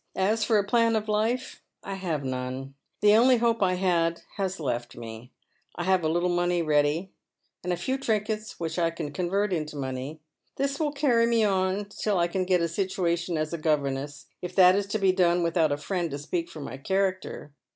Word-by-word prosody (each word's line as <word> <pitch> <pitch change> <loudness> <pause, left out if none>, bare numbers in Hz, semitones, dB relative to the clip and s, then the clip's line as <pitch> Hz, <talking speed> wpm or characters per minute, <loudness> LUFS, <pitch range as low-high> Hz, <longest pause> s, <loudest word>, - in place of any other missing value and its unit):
As 210 +4 +1
fot 225 - +3
a 205 - +3
plan 230 +2 +2
of 215 0 -1
life, 220 +4 -1 0.2
I 195 - -5
have 175 -7 -3
none. 130 +1 -4 0.3
The 210 0 +6
only 250 +3 +6
hope 230 -1 +1
I 185 -2 +3
had 170 -2 +1
has 190 -2 -2
left 120 -5 -3
me. 115 +1 -9 0.4
I 175 - -3
have 185 -1 +2
a 155 - +1
little 175 +2 +1
ready 175 -1 +1
money, 150 +4 +1 0.5
and 180 - -2
a 175 - 0
few 265 +7 -2
trinkets 215 -3 -2
which 165 0 -3
I 165 -1 +3
can 165 -3 -5
convert 190 +5 0
into 155 -3 -3
money. 135 +2 -4 0.4
This 275 +1 -1
will 305 -2 +1
cany 260 -5 +3
me 230 -1 +3
on 190 0 +1
till 200 0 -2
I 170 0 +3
can 185 +1 -1
get 180 -1 +2
a 170 - +2
situation 170 -1 -1
as 155 +1 -2
a 170 - -3
governess 145 -2 -1
— - - -52
if 180 0 -6
that 185 -1 +7
is 200 0 0
to 205 - -1
be 195 -3 +3
done 175 -1 +2
without 165 -2 +2
a 145 - 0
friend 175 +2 -2
to 140 - -4
speak 170 +4 -3
for 155 - -9
my 130 -2 -6
character. 190 -1 -2
180 Hz, 210 wpm, -27 LUFS, 155-205 Hz, 0.5 s, that